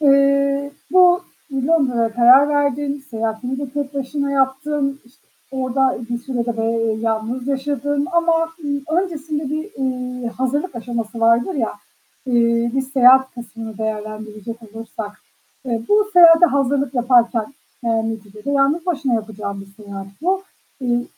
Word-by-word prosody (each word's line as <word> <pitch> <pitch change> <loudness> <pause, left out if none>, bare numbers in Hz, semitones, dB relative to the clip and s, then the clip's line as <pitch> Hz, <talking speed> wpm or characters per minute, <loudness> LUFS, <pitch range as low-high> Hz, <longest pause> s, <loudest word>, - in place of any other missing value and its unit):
eee, 280 0 +3 0.2
bu 360 -1 +6 0.3
Londra'ya 260 -5 +1
karar 250 +5 +6
verdin. 285 -1 0
Seyahatini 225 +3 -3
de 280 -2 -5
tek 285 0 -4
başına 280 +1 -2
yaptın. 275 +1 0
İşte, 240 +2 -26 0.2
orada 265 0 0
bir 240 - -1
süre 245 -1 -3
de, 235 - 0 0.2
eee, 225 -1 0
yalnız 230 +3 -2
yaşadın 285 +1 -1
ama, 335 -1 +2 0.2
ııı, 290 +4 0
öncesinde 310 -5 -4
bir, 310 +4 -3
ııı, 250 -2 -3
hazırlık 260 +5 -2
aşaması 230 -1 -4
vardır 230 +9 +3
ya, 235 -7 -1 0.5
eee, 235 -1 +2
bir 270 - +1
seyahat 265 0 +5
kısmını 230 -2 -8
değerlendirecek 215 0 -5
olursak, 220 -1 -8 0.4
eee, 235 -3 -2
bu 420 0 +3
seyahate 340 -1 +8
hazırlık 275 -1 0
yaparken 240 0 +2 0.3
yani 225 -1 0
neticede 210 +4 -8
yalnız 285 +5 +2
başına 280 -8 0
yapacağın 210 -2 -4
bir 195 +2 -14
seyahat 195 -1 -7 0.2
bu. 380 +3 +1 0.4
Iıı, 240 -1 0
260 Hz, 135 wpm, -20 LUFS, 230-285 Hz, 0.5 s, seyahate